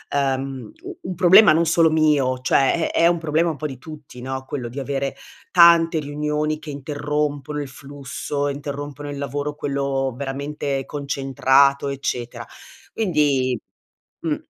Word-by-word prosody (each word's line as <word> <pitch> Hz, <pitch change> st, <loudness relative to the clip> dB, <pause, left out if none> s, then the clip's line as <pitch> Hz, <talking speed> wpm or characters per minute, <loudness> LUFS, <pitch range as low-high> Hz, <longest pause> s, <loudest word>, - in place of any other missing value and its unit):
uhm, 135 Hz, -, -2 dB
u 375 Hz, -1 st, -9 dB
un 185 Hz, -, -4 dB
problema 190 Hz, +2 st, +7 dB
non 165 Hz, +2 st, +2 dB
solo 165 Hz, 0 st, +4 dB
mio, 150 Hz, -5 st, +2 dB
cioè 135 Hz, +5 st, +2 dB
è -, -, +1 dB
è 170 Hz, -, +7 dB
un 170 Hz, -1 st, +2 dB
problema 160 Hz, +1 st, +1 dB
un 150 Hz, -, -8 dB
po' 155 Hz, -, -3 dB
di 135 Hz, -3 st, -8 dB
tutti, 145 Hz, -3 st, -11 dB
no, 130 Hz, +1 st, -4 dB
quello 125 Hz, -5 st, -5 dB
di 130 Hz, -, -6 dB
avere 135 Hz, 0 st, -3 dB, 0.4 s
tante 170 Hz, -2 st, +6 dB
riunioni 150 Hz, +1 st, -2 dB
che 150 Hz, -1 st, -8 dB
interrompono 145 Hz, 0 st, -3 dB
il 145 Hz, -, -5 dB
flusso, 140 Hz, +1 st, -5 dB
interrompono 145 Hz, 0 st, -5 dB
il 140 Hz, -, -6 dB
lavoro, 145 Hz, +1 st, -3 dB
quello 140 Hz, -3 st, -2 dB
veramente 140 Hz, 0 st, -3 dB
concentrato, 140 Hz, 0 st, +2 dB
eccetera, 125 Hz, -3 st, -4 dB, 0.5 s
quindi, 145 Hz, -, +1 dB, 0.7 s
mh, 155 Hz, -3 st, 0 dB
145 Hz, 145 wpm, -22 LUFS, 135-155 Hz, 0.7 s, problema